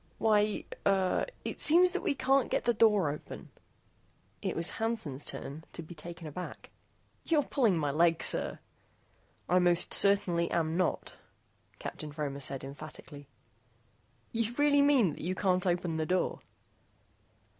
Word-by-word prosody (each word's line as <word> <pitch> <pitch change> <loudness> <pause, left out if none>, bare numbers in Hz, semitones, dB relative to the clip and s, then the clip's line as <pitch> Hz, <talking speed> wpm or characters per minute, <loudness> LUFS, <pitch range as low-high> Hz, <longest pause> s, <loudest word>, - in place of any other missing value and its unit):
"Why, 210 -1 +2 0.2
er, 190 -2 +2 0.2
it - - -4
seems 355 +4 +5
that - - -2
we 280 - 0
can't 270 0 +2
get - - 0
the 240 - +3
door 210 -8 +3
open." 150 - -9 0.9
It - - -2
was 165 0 +2
Hansen's 215 - -2
turn 150 +3 -5
to 170 - -7
be 160 - -10
taken 170 +1 -9
aback. 155 +4 -8 0.5
"You're 310 -3 +2
pulling 230 -12 +2
my 145 -3 0
leg, 165 +2 +2
sir." - - +1 0.9
"I 180 +2 +4
most 175 -1 +2
certainly 180 -4 +2
am 160 -1 0
not," 180 -1 -1 0.6
Captain 150 - -6
Fromer 145 -2 -4
said 135 -1 -2
emphatically. 145 0 -10 1.0
"You 230 0 -1
really 290 0 +4
mean 275 - +4
that - - -10
you 185 +3 -2
can't 185 -1 +1
open 175 -2 0
the 155 -1 -1
door?" 185 +2 0
180 Hz, 145 wpm, -31 LUFS, 155-220 Hz, 1.0 s, seems